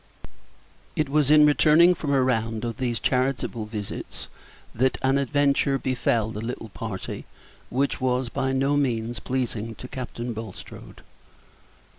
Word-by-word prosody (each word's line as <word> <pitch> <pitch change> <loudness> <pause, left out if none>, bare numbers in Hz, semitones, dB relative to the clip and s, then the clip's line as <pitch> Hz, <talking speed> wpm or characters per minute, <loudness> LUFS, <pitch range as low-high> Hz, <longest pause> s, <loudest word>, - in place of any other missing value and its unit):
It 155 -2 0
was 145 -1 +2
in 150 0 +8
returning 155 +4 +6
from 155 -4 -3
a 135 -2 +4
round 115 -3 0
of 115 -2 -4
these 120 -3 -1
charitable 125 -4 0
visits 105 -2 -6 0.4
that 130 +3 +1
an 135 +1 +3
adventure 140 0 +2
befell 120 -4 0
the 105 - -5
little 115 -1 -5
party 105 -2 -6 0.4
which 135 +2 0
was 125 0 +1
by 130 +2 -1
no 135 +2 +2
means 120 -5 0
pleasing 115 -3 -3
to 125 - -9
Captain 125 -2 -5
Bulstrode. 110 -3 -9
130 Hz, 135 wpm, -25 LUFS, 115-140 Hz, 0.4 s, in